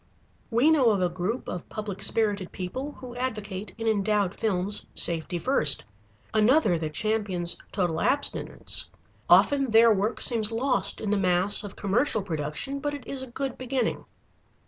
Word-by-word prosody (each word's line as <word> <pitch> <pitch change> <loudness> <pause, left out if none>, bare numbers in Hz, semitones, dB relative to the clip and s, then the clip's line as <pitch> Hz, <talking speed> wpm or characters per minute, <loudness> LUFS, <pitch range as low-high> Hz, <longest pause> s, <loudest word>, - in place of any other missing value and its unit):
We 250 +7 +4
know 275 -7 +4
of 205 -3 +2
a 180 - +2
group 185 +8 -3
of 180 - -6
public 210 -3 -6
spirited 205 -4 +1
people 260 +11 -5
who 250 -2 -10
advocate, 215 -5 -5
in 225 0 -3
endowed 205 -2 +1
films, 200 -1 -2
"safety 170 +1 +2
first," 165 - +2 0.5
another 220 - +4
that 155 -2 -4
champions 205 -5 -1 0.2
total 175 -5 -1
abstinence. 285 +1 0 0.4
Often 275 -2 +5
their 225 0 +6
work 210 +3 -1
seems 225 -3 +2
lost 225 -5 0
in 210 - -2
the 210 - +2
mass 185 +2 +3
of 205 - -8
commercial 215 +2 0
production, 160 - -4
but 290 +1 -3
it 285 - -10
is 275 -1 -4
a 260 - -6
good 265 +1 -4
beginning. 255 -1 -2
215 Hz, 155 wpm, -26 LUFS, 185-250 Hz, 0.5 s, their